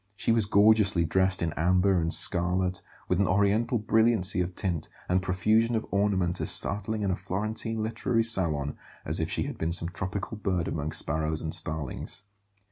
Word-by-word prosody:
She 110 - -1
was 115 -3 +1
gorgeously 100 -4 +4
dressed 95 +2 +1
in 80 -2 -2
amber 90 +3 +2
and 80 0 -1
scarlet, 90 +2 +3 0.3
with 90 - 0
an 100 - +2
Oriental 100 +6 +1
brilliancy 110 -4 +2
of 90 0 -4
tint 90 -6 -3 0.2
and 90 +1 +1
profusion 110 +5 +1
of 110 - -2
ornament 100 -4 0
as - - 0
startling 105 +1 +1
in 95 - 0
a - - 0
Florentine 110 +4 -3
literary 115 +1 -1
salon 80 -10 +1 0.3
as - - 0
if - - -2
she - - 0
had - - -7
been 80 +1 -1
some 85 0 0
tropical 95 +4 -5
bird 90 -5 -2
among 75 0 -3
sparrows 80 +1 -2
and 80 - -4
starlings. 80 +5 -4
95 Hz, 175 wpm, -27 LUFS, 85-110 Hz, 0.3 s, gorgeously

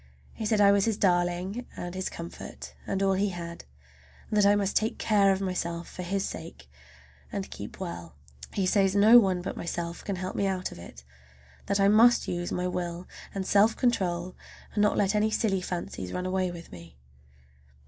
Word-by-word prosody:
He 220 - -4
said 215 -1 +2
I 200 -1 +7
was 200 -1 +3
his 220 -3 0
darling 180 +4 0
and 175 0 -5
his 185 0 -3
comfort 170 0 -9
and 195 0 -1
all 195 0 +3
he 200 +2 +1
had, 170 -2 -7 0.7
and 210 - +1
that 200 - +5
I 205 - +5
must 200 -1 0
take 220 +2 +1
care 200 -3 +3
of 190 0 0
myself 170 -3 -3
for - - -8
his 190 +2 -1
sake, 70 -5 -9 0.6
and - - -4
keep - - -8
well. 85 -3 -6 0.4
He 195 - -1
says 195 0 +2
no 220 +4 +8
one 185 -5 +1
but - - -4
myself 170 0 -4
can 200 - -3
help 185 +1 -5
me 200 - +1
out 185 -1 -2
of - - -10
it, 65 -7 -12 0.6
that 200 - +1
I 195 - +5
must 230 +4 +5
use 175 0 -3
my 180 0 -1
will 175 0 -4 0.3
and 195 -1 -2
self 205 +3 +4
control 185 -7 0 0.4
and 210 - +1
not 210 - +3
let 200 0 +2
any 210 +1 +2
silly 205 -3 0
fancies 170 - -5
run 180 - -3
away 185 0 0
with 170 -1 -9
me. 85 -4 -12
190 Hz, 195 wpm, -28 LUFS, 175-200 Hz, 0.7 s, no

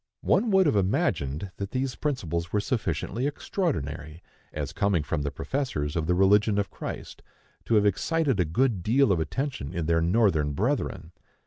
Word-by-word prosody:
One 225 +4 +2
would 190 -2 +5
have 145 - +2
imagined 90 -4 0
that 100 -1 -4
these 130 +1 -2
principles 85 - -2
were 105 - +2
sufficiently 110 - -1
extraordinary, 80 - -3 0.3
as - - -4
coming 100 -6 +1
from 75 +1 -2
the 70 - -1
professors 75 - -3
of 80 -2 -1
the 90 - +2
religion 100 +3 +4
of 100 -1 -1
Christ, - - -7 0.4
to 115 - +2
have 105 -1 +4
excited 135 - +1
a 90 - +3
good 105 +5 +1
deal 120 +5 +3
of 90 - +2
attention 80 - -3
in 85 -2 -1
their 85 +1 +2
Northern 85 -5 +2
brethren. 100 - -1
100 Hz, 165 wpm, -27 LUFS, 80-130 Hz, 0.4 s, would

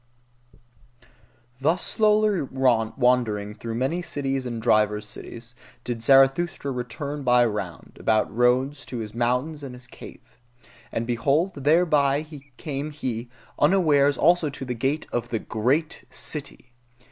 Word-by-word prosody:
Thus 160 +6 +1
slowly 215 -3 +2
wandering 120 -4 +1
through 115 +1 -6
many 135 +9 -1
peoples 135 -5 -3
and 120 -2 -4
divers 105 -2 +2
cities, 115 +2 -10 0.3
did 120 -2 -4
Zarathustra 135 +5 +3
return 140 +4 -5
by 125 -2 +4
round 105 -6 -5
about 110 -2 +1
roads 130 +4 +2
to 125 - -5
his 110 -2 -6
mountains 125 +6 -1
and 135 -3 -7
his 125 0 -10
cave. 120 +1 -14 0.5
And 115 - -2
behold, 140 +10 +1
thereby 145 -1 +2 0.3
came 145 -2 -4
he 125 -5 -5 0.3
unawares 145 -4 +4
also 170 0 +3
to 135 -1 -7
the 125 - -3
gate 135 +6 -1
of 120 0 -2
the 115 - -1
GREAT 130 +10 -1
CITY. 140 -4 -5
130 Hz, 125 wpm, -24 LUFS, 120-150 Hz, 0.5 s, by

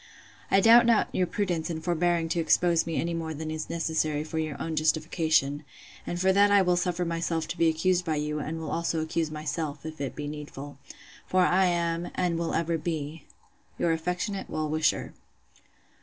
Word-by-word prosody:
'I 195 - +4
doubt 235 +2 +7
not 230 -2 +3
your 180 - +1
prudence 175 -4 -2
in 160 -2 -3
forbearing 170 0 +1
to 170 - 0
expose 170 +1 +3
me 165 - -2
any 170 +1 -1
more 160 -1 -4
than 155 +1 -5
is 155 0 -5
necessary 160 -2 -1
for 160 +1 -4
your 155 -2 -3
own 160 -1 -3
justification; 155 -2 +1 0.4
and 175 - -3
for 190 +1 +3
that 200 +1 +5
I 200 -1 +5
will 180 -1 +2
suffer 180 0 -1
myself 165 -1 -2
to - - -4
be 165 - +5
accused 180 +3 +1
by 160 -3 -1
you, 150 0 -2
and 155 +2 -4
will 160 -2 -5
also 170 -1 -1
accuse 160 0 -1
myself, 155 0 -4
if 155 -2 -7
it 140 - -3
be 145 -1 -5
needful. 145 -2 -8 0.5
For 185 - +2
I 185 +1 +4
am, 170 -1 0
and 175 -2 0
will 170 - -1
ever 165 0 0
be, 155 -1 -4 0.5
'Your 170 - +1
affectionate 180 +5 -2
well 155 0 -2
wisher. 155 0 0
165 Hz, 190 wpm, -27 LUFS, 155-175 Hz, 0.5 s, doubt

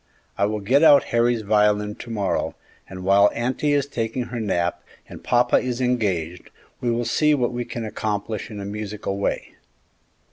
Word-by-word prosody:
I 100 - +1
will 105 0 -2
get 130 +8 +3
out 145 -3 +7
Harry's 120 -1 +2
violin 105 0 +2
to - - -9
morrow, 105 -4 -1 0.3
and 95 0 -8
while 100 +2 +5
auntie 130 +5 0
is 140 -2 +2
taking 120 -2 -3
her 120 0 -6
nap 90 -5 -1 0.3
and - - -11
papa 120 0 +3
is 125 -1 -2
engaged, 95 -10 -1 0.3
we 120 - -1
will 120 0 0
see 150 +3 +3
what 125 -3 -1
we 120 0 -3
can 115 -1 -5
accomplish 105 0 -3
in 105 -2 -7
a 100 - -5
musical 105 -1 -4
way." 100 - -2
110 Hz, 175 wpm, -23 LUFS, 100-120 Hz, 0.3 s, out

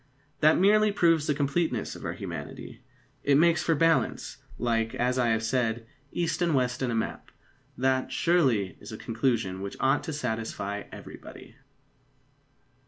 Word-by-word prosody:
That 155 +2 +5
merely 210 +3 +4
proves 165 -6 +3
the 150 - +1
completeness 145 +4 -1
of - - -10
our - - -2
humanity. - - -7 0.4
It 140 -1 +4
makes 170 +1 +4
for 165 - +1
balance, 165 +2 +1 0.2
like, 115 -1 0
as 125 +1 0
I 120 - +2
have 115 -1 +1
said, 115 -1 0 0.3
east 165 -1 -1
and 170 -4 +2
west 125 -1 0
in 130 - 0
a 115 - -1
map. 110 - -3 0.5
That, 130 0 +1
surely, 130 - +2
is - - -10
a - - -6
conclusion 115 -5 -1
which 100 0 -6
ought 135 0 +2
to 160 - -4
satisfy 110 -6 -3
everybody. - - -11
130 Hz, 155 wpm, -27 LUFS, 115-160 Hz, 0.5 s, That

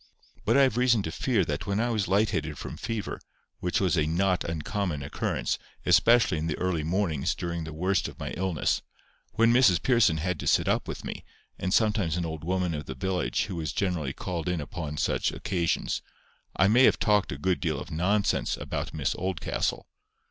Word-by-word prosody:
But - - +4
I 140 - +7
have 130 -4 +2
reason 120 -4 +3
to 80 - -3
fear 105 -1 +1
that 75 +5 -3
when 100 +1 0
I 120 +1 +1
was 105 -5 0
light 100 +3 +2
headed - - -2
from - - -6
fever, 110 -2 -4 0.4
which 90 - 0
was 95 -2 +2
a 80 -2 +2
not 90 +3 +1
uncommon 85 -1 -2
occurrence, 70 - -2 0.3
especially 115 -8 +4
in 80 - -2
the 80 - -2
early 90 -4 -1
mornings 85 -4 0
during 85 -2 -4
the 80 - -7
worst 90 +5 0
of - - -10
my - - -4
illness—when 95 +5 -1
Mrs 115 -9 +5
Pearson 115 -11 +3
had 85 0 -2
to - - -4
sit - - +3
up - - +1
with - - -6
me, - - -6 0.4
and 95 - -2
sometimes 105 -6 +2
an 85 - -1
old 80 -1 -5
woman 90 0 0
of 75 -1 -5
the 65 - -5
village 95 +6 -1
who 95 -3 -5
was 80 -3 -2
generally 85 -8 -1
called 85 +3 -4
in 90 -2 -1
upon 75 -1 -5
such - - +1
occasions—I 90 +2 -2
may 120 +5 +6
have - - +4
talked 105 -2 +2
a 65 - -4
good 90 +4 0
deal 80 -3 -1
of - - -8
nonsense 95 +6 +1
about - - -4
Miss - - 0
Oldcastle. 95 -1 -2
90 Hz, 195 wpm, -27 LUFS, 80-105 Hz, 0.4 s, I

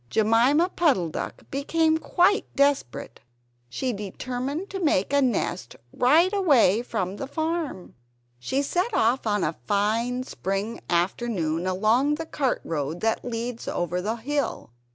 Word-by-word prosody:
Jemima 235 - +3
Puddle 280 - +2
duck - - -6
became 315 +3 +1
quite 380 +6 +2
desperate. 280 - 0 0.5
She 250 - -2
determined 255 - -4
to 385 - -4
make 285 - +1
a 285 - +4
nest 240 -7 -1 0.2
right 320 +10 +4
away 275 - +4
from 190 -5 -3
the 275 - -5
farm. 315 - -3 0.5
She 265 - -1
set 360 +9 -1
off 235 +2 +2
on 205 -2 +1
a 155 +1 -2
fine 230 +5 0
spring 195 -1 -4
afternoon 175 -2 0
along 220 +10 +2
the 325 +1 -5
cart 275 -5 -1
road 155 +1 -3
that 225 0 0
leads 235 0 -4
over 175 +1 -2
the 215 +4 -2
hill. 265 - -3
245 Hz, 135 wpm, -25 LUFS, 195-290 Hz, 0.5 s, a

